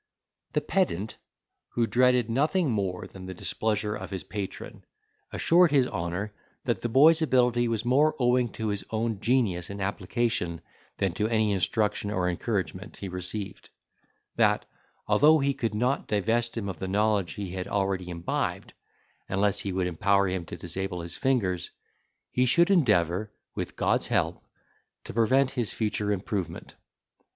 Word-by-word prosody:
The 150 - +1
pedant, 145 - -1 0.6
who 120 - +3
dreaded 125 0 +3
nothing 150 +6 +1
more 95 -4 -2
than 95 -1 -10
the 95 - -6
displeasure 105 +3 -1
of 95 -2 -6
his 95 -4 -5
patron, 100 +2 -6 0.5
assured 175 +1 +4
his 140 -3 +4
honour 95 +1 -3 0.3
that - - -1
the 120 - -2
boy's 155 +7 +6
ability 125 -5 +3
was 115 0 -1
more 145 +5 +3
owing 125 -2 +2
to 110 -1 -3
his 100 -1 -2
own 110 -1 -1
genius 110 -8 +1
and 100 0 -6
application 95 -2 -1 0.4
than 95 -3 0
to 105 +4 0
any 110 -2 +2
instruction 100 +2 0
or 90 -3 0
encouragement 90 -1 -3
he 95 - -6
received; 95 +2 -5 0.7
that, - - +3 0.4
although 155 +3 +5
he 140 -1 +1
could 115 -6 -2
not 125 +5 0
divest 115 +3 +1
him 105 -3 -2
of 95 -5 -5
the 95 - -3
knowledge 100 -1 +1
he 100 -3 -5
had 90 0 -4
already 95 -3 -1
imbibed, 85 -1 -3 0.6
unless 100 +1 +1
he 100 - -3
would 95 0 0
empower 100 +3 +2
him 90 -2 -2
to 85 - -8
disable 90 +1 -4
his 85 0 -7
fingers, 100 - 0 0.6
he 125 +1 +2
should 170 +9 +4
endeavour, 105 - +2 0.2
with - - -5
God's - - +1
help, - - 0 0.6
to - - -8
prevent 130 +4 +3
his 120 -5 -2
future 105 -2 -1
improvement. 95 -3 -3
105 Hz, 155 wpm, -27 LUFS, 95-125 Hz, 0.7 s, boy's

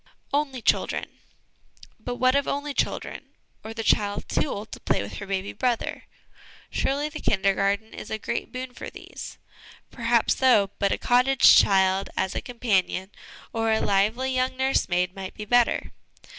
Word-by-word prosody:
' - - -36
Only' 275 -4 -1
Children. - - +1 0.9
But 245 - -5
what 255 +1 +3
of 280 - +1
only 285 +1 -2
children, - - -2 0.4
or 220 - -7
the 225 0 -5
child 205 -1 +1
too - - 0
old 210 -1 -6
to - - -8
play - - 0
with 100 - -7
her 200 - -7
baby 195 0 -3
brother? 245 +1 -2 0.7
Surely 285 +2 0
the 305 0 -7
Kindergarten 200 +2 +1
is - - -8
a 220 - -2
great 235 +2 -4
boon 255 0 -6
for - - -7
these! - - -10 0.5
Perhaps 235 -1 +1
so; 215 -7 +4
but 200 -1 +2
a - - +1
cottage 255 +2 +5
child 190 0 +4
as 190 - 0
a - - -3
companion, 205 -5 -1 0.4
or 225 0 +1
a 220 - +3
lively 220 +7 +1
young 255 0 0
nursemaid, 180 -9 +1
might 190 -1 -7
be 210 - -6
better. 245 +2 +2
225 Hz, 165 wpm, -25 LUFS, 200-255 Hz, 0.9 s, cottage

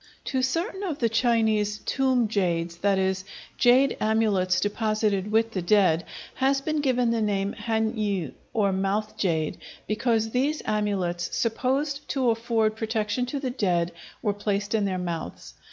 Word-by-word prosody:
To 260 -2 0
certain 335 - -1
of 345 -8 -3
the 230 -4 +1
Chinese 220 -3 +2
"tomb 260 -4 +2
jades"—that 175 -1 0
is, 190 0 0 0.4
jade 255 +3 +5
amulets 210 -4 +2
deposited 210 -1 0
with 225 +1 +2
the 190 - -2
dead—has 200 +8 +1
been 305 +2 -1
given 250 -4 +2
the 230 -1 0
name 200 -1 0
han 220 +1 -1
yü, 200 - -1 0.2
or 205 -4 +1
"mouth 195 +3 -1
jade," 160 -5 -1 0.3
because 225 0 0
these 280 +5 0
amulets, 195 -5 -1
supposed 270 +5 -1
to 260 -4 +2
afford 225 -1 0
protection 220 +2 -1
to 280 +3 -3
the 260 -2 -2
dead, 175 -8 0 0.3
were 205 -3 +1
placed 205 0 -2
in 215 -2 +2
their 190 -2 -1
mouths. 170 -2 -5
215 Hz, 145 wpm, -26 LUFS, 195-245 Hz, 0.4 s, jade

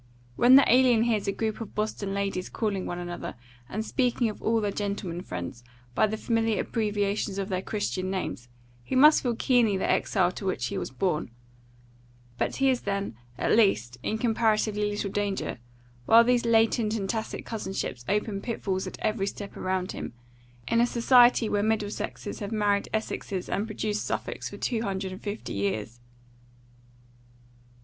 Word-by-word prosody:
When 245 - +7
the 275 - +9
alien 245 -2 +5
hears 215 -4 0
a - - +2
group 220 +2 -3
of 225 - -7
Boston 210 -2 -2
ladies 195 -2 -2
calling 205 -4 -2
one 175 - -4
another, 175 -3 -5 0.3
and 215 +2 -3
speaking 245 -2 +1
of 210 - -8
all 225 0 +2
their 205 -2 -1
gentlemen 200 -4 -3
friends, 90 - -6 0.3
by 215 - +3
the 220 +1 -3
familiar 225 -1 +1
abbreviations 205 -2 -1
of 195 0 -2
their 185 -1 -1
Christian 190 -3 -2
names, 185 -10 -3 0.4
he 120 - -3
must 300 +4 +7
feel 245 -3 0
keenly 230 -5 +3
the - - -1
exile 180 -3 +2
to 195 - -7
which 130 -9 -1
he - - -3
was - - -4
born; 150 +3 -1 1.1
but - - 0
he 270 - +2
is 255 - -1
then, 200 - -2 0.2
at - - +2
least, 125 - +2
in 215 - -1
comparatively 220 -2 +1
little 205 -1 -3
danger; 200 -10 -2 0.5
while 230 +1 +8
these 245 0 +2
latent 225 -1 +3
and 200 -3 -2
tacit 220 +2 -3
cousinships 195 - -4
open 205 -1 0
pitfalls 195 -5 -2
at - - -7
every 215 -2 0
step 200 0 -6
around 185 0 -2
him, - - -6 0.5
in 230 - +3
a 240 - +4
society 245 -1 +5
where 205 -1 +1
Middlesexes 210 -1 -2
have 205 0 -5
married 205 -2 +1
Essexes 200 -3 -3
and 205 +3 -1
produced 215 -1 -2
Suffolks - - -3
for - - -9
two 230 -3 -1
hundred 190 -3 -3
and 185 - -8
fifty 205 +1 -5
years. 105 +4 -2
205 Hz, 170 wpm, -27 LUFS, 190-225 Hz, 1.1 s, the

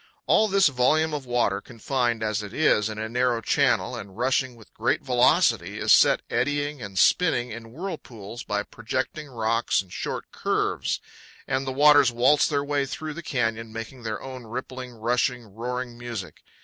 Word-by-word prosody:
All 220 - +4
this 195 -2 +4
volume 150 +4 +2
of 140 -3 -4
water, 120 -5 +1
confined, 120 0 -2
as 110 -1 -1
it 105 -1 -8
is, 110 -8 +3
in 110 - -6
a 110 +1 -3
narrow 120 0 +1
channel 120 +2 +1
and 100 -4 -9
rushing 130 +1 0
with 110 -2 -18
great - - 0
velocity, - - +3
is - - +5
set - - +5
eddying 145 +2 -1
and 100 -3 -7
spinning 125 - +3
in 115 +1 -9
whirlpools 125 - -7
by 105 0 -2
projecting 130 +8 -4
rocks 115 -1 0
and 95 -2 -6
short - - -5
curves, - - -1 0.5
and 135 0 -1
the - - -1
waters 145 -1 +6
waltz 125 +5 +4
their 145 -2 0
way 145 -1 0
through 155 +3 -5
the 170 - -7
canyon, 115 -6 -2
making 115 +3 -7
their 110 -3 -4
own 130 -2 -8
rippling, 125 +2 -6
rushing, 120 +1 0
roaring 125 +2 -4
music. 115 -9 -7
125 Hz, 170 wpm, -25 LUFS, 115-135 Hz, 0.5 s, waters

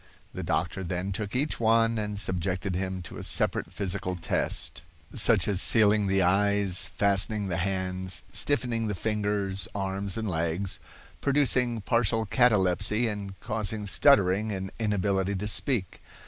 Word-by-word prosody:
The - - -5
doctor 90 +3 -2
then 90 +2 -3
took 105 +3 -4
each 145 +4 -1
one 115 0 +3
and 105 -1 -4
subjected 95 -1 -1
him 95 0 -3
to - - -9
a - - -6
separate - - 0
physical 90 -2 -3
test, 80 -1 -2 0.3
such - - +3
as 100 -2 +2
sealing 105 -2 +4
the 95 0 +2
eyes, 100 0 +2
fastening 100 0 0
the 85 - -1
hands, 95 0 -2
stiffening 120 -5 +1
the 105 - -2
fingers, 100 -2 -1
arms, 95 0 -2
and 110 -1 -3
legs, 85 +2 -2 0.4
producing 125 -5 +1
partial 115 0 +1
catalepsy 105 -1 +2
and 100 -3 -5
causing 105 -1 -3
stuttering 100 -2 +4
and 95 -1 -4
inability 100 -2 0
to 100 +2 -3
speak. 105 - -1
100 Hz, 140 wpm, -27 LUFS, 95-110 Hz, 0.4 s, sealing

